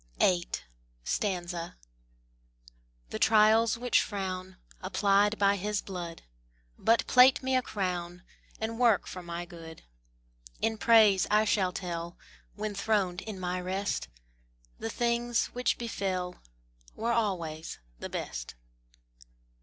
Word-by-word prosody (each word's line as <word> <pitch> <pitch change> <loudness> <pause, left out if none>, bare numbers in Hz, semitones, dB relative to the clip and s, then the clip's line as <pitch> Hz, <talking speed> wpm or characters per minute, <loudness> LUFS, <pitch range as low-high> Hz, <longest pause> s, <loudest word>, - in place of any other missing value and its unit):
VIII. 175 -2 +3 2.6
The - - -3
trials 220 +1 +5
which 245 +1 +3
frown, 185 -2 -4 0.2
Applied 200 +2 +2
by 200 0 +3
His 205 +2 -1
blood, 175 -3 -6 0.5
But 230 +1 +2
plait 260 +1 +6
me 260 0 +1
a 255 - +4
crown, 180 -5 -3 0.4
And 225 +1 -3
work 235 -4 +4
for 185 - -7
my 170 0 -5
good. 165 -2 -11 0.8
In 220 -1 0
praise 215 -5 +5
I 215 +1 +4
shall 190 -3 +2
tell, 170 -2 -5 0.4
When 215 0 -3
throned 195 -3 0
in 210 -4 -7
my 180 0 -2
rest, 190 - -2 0.7
The 115 - -3
things 235 - 0
which 250 0 0
befell 185 -6 -3 0.5
Were 230 +1 -1
always 170 -8 -2 0.2
the - - -6
best. - - -5
200 Hz, 115 wpm, -29 LUFS, 180-220 Hz, 2.6 s, plait